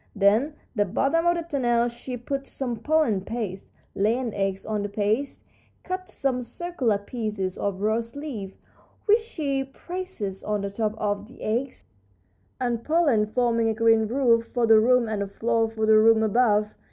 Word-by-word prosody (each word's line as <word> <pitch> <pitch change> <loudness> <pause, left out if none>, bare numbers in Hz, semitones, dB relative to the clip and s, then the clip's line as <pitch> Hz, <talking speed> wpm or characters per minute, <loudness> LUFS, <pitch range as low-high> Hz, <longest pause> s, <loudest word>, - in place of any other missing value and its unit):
In 215 +9 +3 0.2
the 205 - +3
bottom 275 - +1
of 345 - +4
the 340 - -2
tunnel 240 -7 +1
she 240 +1 -6
puts 275 +3 -4
some 245 -4 -3
pollen 270 -5 +1
paste, 200 -3 -5 0.3
lays 215 +4 +1
an 240 -4 -3
egg 195 -1 -1
on 215 -1 -1
the 205 - -3
paste, 215 +7 -1 0.4
cuts 370 0 -5
some 260 -2 0
circular 260 - -1
pieces 205 -3 -4
of 200 -1 -3
rose 225 +3 -1
leaf, 240 -10 -6 0.5
which 430 +2 +5
she 295 -12 -2
presses 270 - -6
on 210 -1 -1
the 200 0 -3
top 215 +1 -1
of 205 -1 -2
the 255 - -13
egg 245 +5 -1 0.8
and 240 -2 -1
pollen, 295 -10 +3
forming 230 0 +1
a 220 - -1
green 225 -1 +4
roof 230 -2 +2
for 240 -1 0
the 225 -1 +7
room 245 +1 +4
and 215 -2 -2
a 200 - -2
floor 225 +2 0
for 220 -1 -2
the 215 0 +6
room 220 0 +5
above. 215 -1 +2
230 Hz, 175 wpm, -25 LUFS, 210-270 Hz, 0.8 s, the